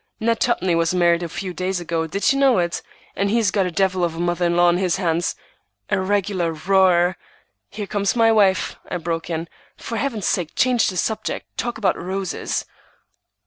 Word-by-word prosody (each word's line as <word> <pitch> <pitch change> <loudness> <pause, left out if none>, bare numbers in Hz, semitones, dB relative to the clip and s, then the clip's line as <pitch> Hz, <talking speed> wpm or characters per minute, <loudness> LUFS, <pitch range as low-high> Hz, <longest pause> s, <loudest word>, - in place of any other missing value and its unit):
Ned 230 0 +1
Tupney 190 -8 +1
was 165 +1 +1
married 170 -1 +3
a 170 - -4
few 185 +2 -5
days 185 +1 -2
ago, 165 -1 -2
did 200 - +1
you 275 - -1
know 270 -3 +4
it? 170 -1 -1 0.3
and 200 0 0
he's 220 -2 +2
got 195 -3 +1
a - - -4
devil 185 +1 +1
of 170 -2 -1
a - - -7
mother 175 0 0
in 170 0 0
law 175 0 +5
on 175 0 +3
his 180 -2 +1
hands, 170 -2 0 0.6
a 190 - +2
regular 185 -3 0
roarer—" 180 +1 +3 0.5
"Here 205 0 -5
comes 200 +1 -1
my 225 -1 +4
wife," 200 -4 +2
I 180 - -2
broke 165 -1 -3
in. 165 0 -3 0.3
"For 230 - -5
Heaven's 230 -7 -2
sake, 170 -3 -1
change 250 -2 +3
the 185 - -5
subject. 220 +4 -3
Talk 240 0 -3
about 215 -3 0
roses!" 190 +1 -3
185 Hz, 195 wpm, -21 LUFS, 175-205 Hz, 0.6 s, law